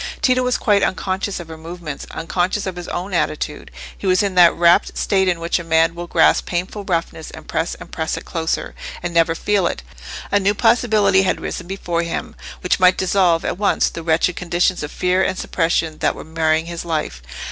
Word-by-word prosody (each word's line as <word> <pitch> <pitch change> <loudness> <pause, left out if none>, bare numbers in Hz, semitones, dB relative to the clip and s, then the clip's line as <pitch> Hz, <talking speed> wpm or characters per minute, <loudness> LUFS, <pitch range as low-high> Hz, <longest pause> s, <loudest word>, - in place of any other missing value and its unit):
Tito 255 -4 +3
was 250 0 +1
quite 205 -2 +2
unconscious 190 +1 -1
of 175 - -8
her 160 -1 -10
movements—unconscious 175 +3 -3
of 190 -2 -4
his 175 0 -7
own 185 +3 -4
attitude: 155 -2 -2 0.3
he 195 - -5
was 185 +1 +3
in 200 -2 -1
that 175 -2 +7
wrapt 170 0 +3
state 190 -1 +1
in 175 -2 +1
which 170 +1 0
a - - -6
man 165 0 +3
will 175 0 -7
grasp - - +3
painful 185 +4 -3
roughness, 165 -3 -2
and - - -12
press 165 +2 -2
and - - -12
press 160 -1 -2
it - - -8
closer, 160 -1 -2 0.3
and 175 - -3
never 165 -1 +3
feel 200 0 +1
it. - - -4 0.5
A 205 - +4
new 200 +1 +1
possibility 210 -4 +3
had 190 - 0
risen - - -5
before 175 -3 -2
him, 170 -1 -4 0.3
which 180 - +1
might 185 0 +5
dissolve 180 -3 +2
at - - -2
once 205 - +2
the 165 - -6
wretched 165 +2 +1
conditions 180 +1 0
of 150 - -5
fear 185 +1 +1
and 190 - 0
suppression 165 -3 -1
that - - +1
were - - -8
marring 160 0 0
his 170 0 -6
life. 155 - -3
175 Hz, 200 wpm, -20 LUFS, 165-190 Hz, 0.5 s, that